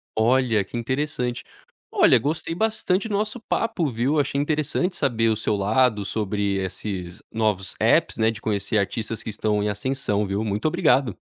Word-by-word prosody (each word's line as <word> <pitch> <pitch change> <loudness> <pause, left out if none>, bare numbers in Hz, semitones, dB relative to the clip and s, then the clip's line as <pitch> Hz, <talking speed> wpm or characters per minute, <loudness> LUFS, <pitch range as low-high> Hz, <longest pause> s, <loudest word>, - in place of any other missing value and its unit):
Olha 115 -1 +3
que 120 - -7
interessante, 125 0 -2 0.5
olha, - - +5
gostei 160 +3 -2
bastante 215 -1 0
do 215 - -4
nosso 215 +4 -1
papo, 225 -7 -1
viu? 130 +6 0
Achei 140 0 0
interessante 155 +5 0
saber 115 -5 +1
o 110 - +2
seu 110 - 0
lado 105 +2 +2
sobre 100 -1 -1
esses 95 -1 -4
novos 105 -4 -1
APPs, - - +3
né, 110 0 +3
de 110 -1 -10
conhecer 105 0 -1
artistas 110 +2 -2
que - - -5
estão 105 0 0
em 105 - 0
ascensão, 105 -1 -1
viu, 100 +2 -2
muito 105 +5 -1
obrigado! 155 - +2
115 Hz, 165 wpm, -24 LUFS, 105-145 Hz, 0.5 s, olha